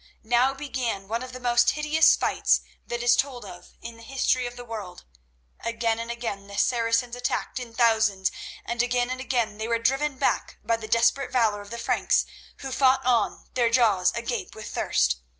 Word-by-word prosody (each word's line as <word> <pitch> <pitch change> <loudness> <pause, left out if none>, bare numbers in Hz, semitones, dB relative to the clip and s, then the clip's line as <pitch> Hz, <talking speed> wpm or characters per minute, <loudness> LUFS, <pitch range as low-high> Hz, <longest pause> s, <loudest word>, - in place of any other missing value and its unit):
Now 245 +4 +2
began 255 -8 -3
one 230 +3 -2
of 255 0 -7
the 255 - -8
most 240 -1 +3
hideous 305 +1 +4
fights - - +2 0.3
that 240 0 -3
is 240 0 +5
told 255 -5 -2
of 180 -2 -12
in 230 0 -8
the - - -15
history 255 0 0
of 245 - -8
the 245 0 -9
world. 210 -6 -8 0.5
Again 230 -1 -1
and 230 0 -5
again 230 -4 -5
the 200 0 -9
Saracens 235 +1 +1
attacked 245 +1 -2
in 235 -2 -9
thousands, 220 -5 +2 0.3
and 235 0 -1
again 245 0 0
and 255 0 -4
again 235 -5 -1
they 220 - -3
were 230 0 +1
driven 270 +4 0
back 270 - -1
by 230 +1 +1
the 220 -1 -8
desperate 240 +4 +2
valour 220 -5 +2
of 205 - -12
the 235 - -6
Franks, - - +1 0.4
who 270 - -5
fought 260 -1 +3
on, 245 -2 +1
their 240 -2 +2
jaws 220 -6 +3
agape 235 +1 -4
with 220 - -8
thirst. - - +1
235 Hz, 190 wpm, -25 LUFS, 225-255 Hz, 0.5 s, is